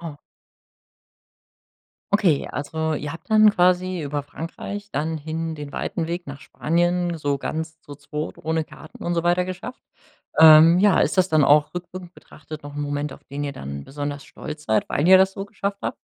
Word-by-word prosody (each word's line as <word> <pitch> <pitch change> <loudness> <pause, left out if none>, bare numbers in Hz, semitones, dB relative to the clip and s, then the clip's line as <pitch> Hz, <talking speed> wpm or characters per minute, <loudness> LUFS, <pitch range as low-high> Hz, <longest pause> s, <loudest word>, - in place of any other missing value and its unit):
wow. 165 -4 -7 2.0
Okay, 185 -8 +2
also 160 +2 -2
ihr 145 0 -4
habt 165 +6 -12
dann 215 0 +7
quasi 180 -1 +2
über 145 -1 -3
Frankreich 175 +7 -7
dann 160 +2 -2
hin 160 +2 -4
den 145 -2 -8
weiten 165 -2 -3
Weg 175 0 -4
nach 140 0 -8
Spanien 175 +1 0
so 145 -2 0
ganz 160 +3 -5
so 145 - -10
zu 140 0 -23
zweit 150 +1 -5
ohne 160 0 -1
Karten 155 - -13
und 175 - -1
so 170 - 0
weiter 175 +1 +2
geschafft. 185 +7 -7 0.6
Ähm, 160 +2 +9
ja, 205 0 +4
ist - - +1
das 185 0 +4
dann 155 -3 +4
auch 150 +3 +4
rückwirkend 180 0 -8
betrachtet 155 0 -11
noch 145 0 -9
'n 145 - -4
Moment, 145 0 -3
auf - - -15
den 145 +1 -5
ihr 140 - -3
dann 70 - -7
besonders 145 0 -5
stolz 150 0 -9
seid, 110 -1 +1
weil 150 - 0
ihr 190 0 +8
das 190 0 +3
so 195 0 -5
geschafft 200 -1 -4
habt? - - -3
160 Hz, 190 wpm, -23 LUFS, 145-180 Hz, 2.0 s, Ähm